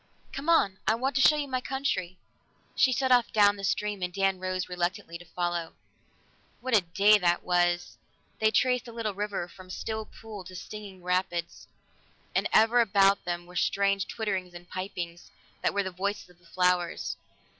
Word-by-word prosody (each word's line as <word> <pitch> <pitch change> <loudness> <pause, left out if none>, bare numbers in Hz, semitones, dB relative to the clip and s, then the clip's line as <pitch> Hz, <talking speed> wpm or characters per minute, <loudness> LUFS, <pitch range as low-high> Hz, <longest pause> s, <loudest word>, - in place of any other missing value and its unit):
"Come 280 +4 -4
on! 195 - +3
I 220 - +4
want 265 +4 -1
to - - +3
show 305 - +7
you 295 -1 -2
my 255 -1 -2
country." 220 -10 -2 0.6
She 260 - +4
set 260 +1 +1
off 245 -1 +4
down 205 -1 +5
the 200 - -9
stream, 205 0 -1
and 180 0 -2
Dan 195 0 +1
rose 185 0 -2
reluctantly 175 -1 -3
to 175 - -13
follow. 175 -1 -3 0.9
What 255 -1 0
a 210 - +6
day 195 +5 +4
that 175 -2 +2
was! 175 0 +1 0.4
They 220 - +4
traced 250 +3 +2
the 235 - -10
little 225 -3 -2
river 200 -3 -3
from 185 +1 -14
still 220 +4 -4
pool 215 -3 -10
to 185 +1 -10
singing 195 0 -9
rapids, 180 -2 -2 0.7
and - - +1
ever 225 +2 +5
about 200 -2 +3
them 175 0 -3
were 180 - -15
the 180 - +1
strange 200 0 +1
twitterings 190 -5 -3
and 175 0 -11
pipings 175 -2 -6 0.3
that - - +2
were 200 0 0
the 190 - -4
voices 200 +1 -3
of 175 - -24
the 175 - -22
flowers. 180 -1 0
195 Hz, 185 wpm, -28 LUFS, 180-220 Hz, 0.9 s, show